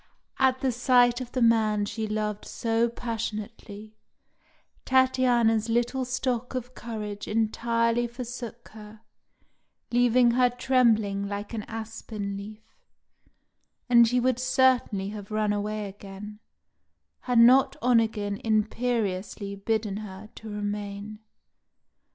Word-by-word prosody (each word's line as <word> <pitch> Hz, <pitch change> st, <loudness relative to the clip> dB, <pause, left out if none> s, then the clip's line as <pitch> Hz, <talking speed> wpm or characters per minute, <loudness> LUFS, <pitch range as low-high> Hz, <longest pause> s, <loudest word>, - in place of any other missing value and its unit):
At 260 Hz, -1 st, +3 dB
the 265 Hz, -, +1 dB
sight 245 Hz, 0 st, +3 dB
of 245 Hz, -1 st, -7 dB
the 255 Hz, -, +1 dB
man 215 Hz, -3 st, +3 dB
she 220 Hz, +1 st, -4 dB
loved 210 Hz, -1 st, -2 dB
so 230 Hz, 0 st, 0 dB
passionately, 215 Hz, -2 st, -6 dB, 0.9 s
Tatiana's 245 Hz, -4 st, +3 dB
little 240 Hz, +3 st, 0 dB
stock 250 Hz, 0 st, -2 dB
of 250 Hz, 0 st, -5 dB
courage 210 Hz, -4 st, -6 dB
entirely 230 Hz, +2 st, +1 dB
forsook 240 Hz, -1 st, -8 dB
her, 215 Hz, 0 st, -13 dB, 0.9 s
leaving 245 Hz, 0 st, +4 dB
her 250 Hz, +1 st, +3 dB
trembling 230 Hz, -6 st, +2 dB
like 205 Hz, +2 st, -5 dB
an 220 Hz, -, -3 dB
aspen 220 Hz, -2 st, -6 dB
leaf, 210 Hz, +2 st, -9 dB, 1.2 s
and 235 Hz, -2 st, +6 dB
she 250 Hz, +2 st, +2 dB
would 250 Hz, 0 st, +1 dB
certainly 255 Hz, -6 st, +2 dB
have 205 Hz, -1 st, -8 dB
run 215 Hz, -1 st, 0 dB
away 210 Hz, 0 st, -3 dB
again, 200 Hz, +1 st, -10 dB, 0.9 s
had 245 Hz, -, +3 dB
not 250 Hz, +3 st, +6 dB
Onegin 220 Hz, -4 st, +2 dB
imperiously 215 Hz, -3 st, -1 dB
bidden 210 Hz, 0 st, -2 dB
her 210 Hz, 0 st, -9 dB
to 220 Hz, -, -9 dB
remain. 205 Hz, 0 st, -5 dB
225 Hz, 110 wpm, -26 LUFS, 210-245 Hz, 1.2 s, and